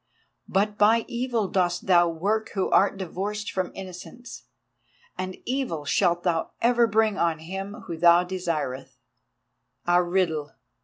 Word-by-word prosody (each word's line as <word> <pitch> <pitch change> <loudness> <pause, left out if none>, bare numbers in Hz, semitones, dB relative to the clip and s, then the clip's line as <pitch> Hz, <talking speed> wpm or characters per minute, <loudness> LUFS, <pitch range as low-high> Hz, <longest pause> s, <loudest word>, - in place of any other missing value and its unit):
But 205 +2 0
by 220 +2 +4
Evil 240 -4 -1
dost 180 -2 0
thou 175 -2 +5
work 200 +7 -1
who 190 - 0
art 200 0 +3
divorced 200 +3 -4
from 185 -1 -2
Innocence, 195 +6 -10 0.7
and 185 0 -5
evil 250 - -2
shalt 175 +3 +1
thou 165 -3 -1
ever 235 0 +3
bring 215 -1 +1
on 165 -2 +1
him 195 +5 -7
whom 165 -2 -6
thou 175 +1 +6
desireth. 170 -8 -4 0.9
A 175 0 +4
riddle! 175 -5 -1
185 Hz, 135 wpm, -25 LUFS, 175-210 Hz, 0.9 s, thou